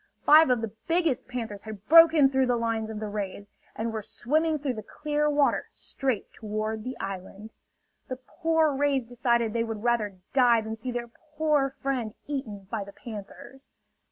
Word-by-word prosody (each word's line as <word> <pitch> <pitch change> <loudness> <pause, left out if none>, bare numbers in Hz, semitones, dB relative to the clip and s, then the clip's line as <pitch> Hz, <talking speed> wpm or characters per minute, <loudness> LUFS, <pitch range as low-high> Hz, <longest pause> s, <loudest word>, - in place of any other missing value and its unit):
Five 310 -1 +8
of 250 -2 +2
the 225 -2 -4 0.2
biggest 330 -6 +1
panthers 230 -5 -5
had 215 -2 -9
broken 320 -4 +7
through 265 -1 +2
the 245 - +2
lines 230 -1 -1
of 220 -1 -5
the 215 - -4
rays, 205 -1 -5 0.3
and 225 +1 -3
were 220 - -3
swimming 310 +9 0
through 265 -6 -3
clear 300 +6 -1
water 290 -1 +2
straight 260 -7 -3
toward 215 0 -4
the 255 +2 -5
island. 195 +2 -7 0.6
The 255 - -4
poor 315 +4 0
rays 275 -2 +1
decided 235 -2 0
they 230 -1 +1
would 225 -2 -5
rather 220 -5 0 0.2
die 245 -4 +5
than 220 0 -5
see 230 +3 -6
their 240 -1 -5 0.3
poor 300 -3 +2
friend 250 -6 -2
eaten 220 -9 -5
by 220 -3 -2
the 200 0 -12
panthers. 230 +5 -10
240 Hz, 170 wpm, -27 LUFS, 215-275 Hz, 0.6 s, Five